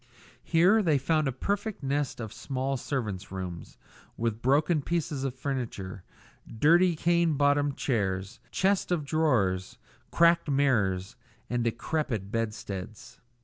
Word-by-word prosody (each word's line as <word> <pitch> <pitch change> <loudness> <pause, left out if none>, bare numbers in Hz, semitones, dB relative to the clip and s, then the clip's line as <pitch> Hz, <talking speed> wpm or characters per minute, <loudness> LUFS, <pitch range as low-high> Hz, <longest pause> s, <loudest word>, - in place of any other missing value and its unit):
Here 180 +7 +4
they 160 -7 +3
found 155 +2 +1
a - - +1
perfect 200 - -3
nest 140 -1 -1
of 110 -3 -6
small 135 0 -2
servants' 110 -8 -4
rooms, 90 -3 -6 0.4
with 115 -1 -2
broken 150 +5 +3
pieces 155 -3 -2
of 135 -2 -2
furniture, 120 -9 -4 0.5
dirty 170 +8 +4
cane 170 0 +2
bottomed 145 0 +2
chairs, 95 -6 -1
chests 195 -1 +1
of 165 -5 0
drawers, 115 - +1 0.3
cracked 170 -1 +4
mirrors, 115 -7 +1 0.3
and 120 -1 0
decrepit 115 -3 -2
bedsteads. 105 -2 -5
135 Hz, 120 wpm, -28 LUFS, 110-160 Hz, 0.5 s, Here